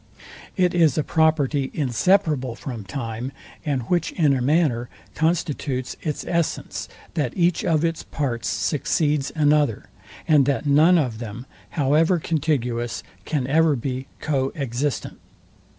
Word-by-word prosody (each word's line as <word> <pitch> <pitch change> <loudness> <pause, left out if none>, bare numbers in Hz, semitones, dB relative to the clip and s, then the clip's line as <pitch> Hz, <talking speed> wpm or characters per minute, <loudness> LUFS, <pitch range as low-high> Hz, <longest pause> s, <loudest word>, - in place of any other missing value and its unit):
It 180 -1 +3
is 165 -6 +3
a 155 - +2
property 150 -4 +2
inseparable 145 - +1
from 120 -4 -6
time, 115 +3 -4 0.3
and 140 -6 -1
which 175 +6 0
in 150 -5 +3
a 130 - -1
manner 130 -4 +1 0.2
constitutes 155 -5 -1
its 150 -3 -3
essence, 170 -2 -2 0.3
that 145 -7 -2
each 175 -1 +2
of 160 -1 +2
its 165 -1 -1
parts 120 -6 -3
succeeds 150 -1 0
another, 150 -6 +2 0.4
and 145 -4 +5
that 140 +1 0
none 155 +5 +5
of 125 -8 -1
them, 115 +1 -7 0.3
however 155 +5 +3
contiguous, 130 -8 -1 0.2
can 145 -5 -1
ever 155 +2 +3
be 130 +1 -4
co 135 -3 0
existent. 140 0 -3
145 Hz, 130 wpm, -23 LUFS, 130-160 Hz, 0.4 s, and